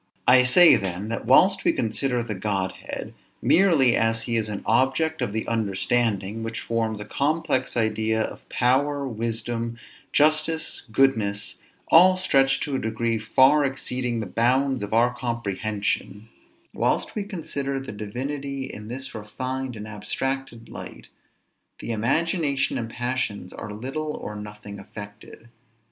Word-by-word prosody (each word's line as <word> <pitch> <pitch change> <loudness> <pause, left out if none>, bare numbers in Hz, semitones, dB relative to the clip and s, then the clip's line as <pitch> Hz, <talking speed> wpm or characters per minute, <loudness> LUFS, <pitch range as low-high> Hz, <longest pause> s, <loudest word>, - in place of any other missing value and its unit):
I 125 +1 +8
say 145 +8 +7
then, 95 +2 -4
that 115 - -4
whilst - - +5
we - - +3
consider 120 +2 -1
the 115 -2 -4
Godhead 95 -1 -4 0.3
merely 160 -10 +4
as 115 0 +1
he 120 - -2
is 110 -1 0
an 105 -1 -5
object 135 +7 +1
of - - -1
the 110 +1 -3
understanding, 110 -1 0
which 115 0 -4
forms 115 -2 -1
a 105 - -6
complex 145 +1 0
idea 110 0 +1
of - - -8
power, 140 +3 +1
wisdom, 115 0 -3 0.3
justice, 155 +1 +1
goodness, 110 -6 +1 0.3
all 185 +3 +7
stretched 135 -7 +3
to 145 -3 -2
a - - 0
degree 110 +1 -1
far 130 +7 +4
exceeding 125 -3 -2
the - - -4
bounds 125 +6 +1
of 105 - -5
our 120 +2 +3
comprehension, 110 -3 -3 0.4
whilst - - 0
we 210 - -2
consider 145 -8 -4
the 135 - -7
divinity 135 +6 -4
in 105 -5 -8
this 130 +3 -5
refined 130 +4 -4
and 105 0 -7
abstracted 120 +3 -4
light, - - -9 0.7
the - - -5
imagination 140 - 0
and 115 -1 -4
passions 120 -6 -3
are 105 - -7
little 135 +8 -4
or 105 - -6
nothing 105 -1 -9
affected. 105 +3 -11
120 Hz, 140 wpm, -24 LUFS, 110-135 Hz, 0.7 s, I